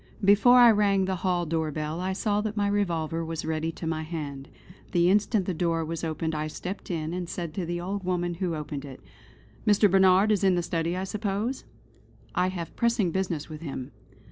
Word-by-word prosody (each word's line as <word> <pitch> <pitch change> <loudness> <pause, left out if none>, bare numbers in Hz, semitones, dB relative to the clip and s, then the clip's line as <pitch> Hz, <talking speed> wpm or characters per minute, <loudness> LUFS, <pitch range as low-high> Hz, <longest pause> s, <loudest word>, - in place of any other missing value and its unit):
Before 210 +5 +6
I 240 -2 +9
rang 200 -2 +3
the 190 0 -1
hall 175 0 0
door 160 -1 -1
bell 155 +2 -3
I 185 +1 -1
saw 205 +1 0
that 215 0 -4
my 205 -1 +2
revolver 165 -5 0
was 165 -1 -4
ready 160 0 -1
to 165 - -7
my 160 -1 -1
hand. 150 -4 -6 0.4
The 175 0 +4
instant 205 0 +2
the 185 - -1
door 165 -1 0
was 165 +1 -5
opened 160 0 -2
I 155 0 -2
stepped 180 +5 -6
in, 160 -2 -2
and 180 -1 -4
said 170 -3 -4
to 175 -1 -3
the 175 0 -2
old 190 +3 -4
woman 175 -1 -1
who 175 -1 -2
opened 150 -2 -5
it: 135 -3 -9 0.7
"Mr. 205 -1 +5
Barnard 190 +2 +5
is 205 -2 +1
in 190 -2 +4
the 175 - 0
study 170 +1 -1
I 185 - -2
suppose? 210 +5 -2 0.7
I 180 0 +2
have 175 -3 -5
pressing 230 -6 +1
business 180 -4 -2
with 155 -1 -9
him!" 135 -5 -6
175 Hz, 205 wpm, -27 LUFS, 160-195 Hz, 0.7 s, I